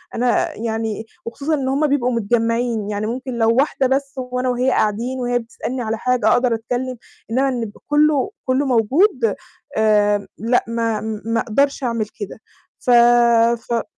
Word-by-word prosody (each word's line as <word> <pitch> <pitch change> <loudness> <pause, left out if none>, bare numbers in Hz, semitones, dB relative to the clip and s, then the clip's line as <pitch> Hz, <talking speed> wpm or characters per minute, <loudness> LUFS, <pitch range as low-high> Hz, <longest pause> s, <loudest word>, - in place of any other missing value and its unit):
أنا 245 +1 +1
يعني 225 -1 -3 0.2
وخصوصًا 280 +7 -3
إن 270 -3 -1
هُم 285 +3 +1
بيبقوا 260 -3 +1
متجمّعين، 230 -1 0
يعني 210 +1 -2
ممكن 255 +2 -4
لو 225 0 +3
واحدة 270 0 +2
بس 275 +1 -1
وأنا 250 0 -2
وهي 250 +1 +1
قاعدين 235 +5 0
وهي 245 0 0
بتسألني 245 +2 -5
على 220 -1 -2
حاجة 250 +2 +1
أقدر 245 -1 +3
أتكلّم، 245 +3 -3 0.3
إنما 265 +3 +2
إن 250 -2 -2
يبقى 210 -1 -9
كلّه 300 +5 +2
كلّه 260 +2 +1
موجود 250 - +2 0.4
آمم 210 -1 +2
لأ 235 +3 +1
ما 230 -2 -1 0.2
ما 230 0 0
أقدرش 275 +6 0
أعمل 230 -3 -1
كده. 205 +1 -6 0.4
ف - - -5 0.8
ف 235 -1 0
245 Hz, 155 wpm, -20 LUFS, 225-260 Hz, 0.8 s, لو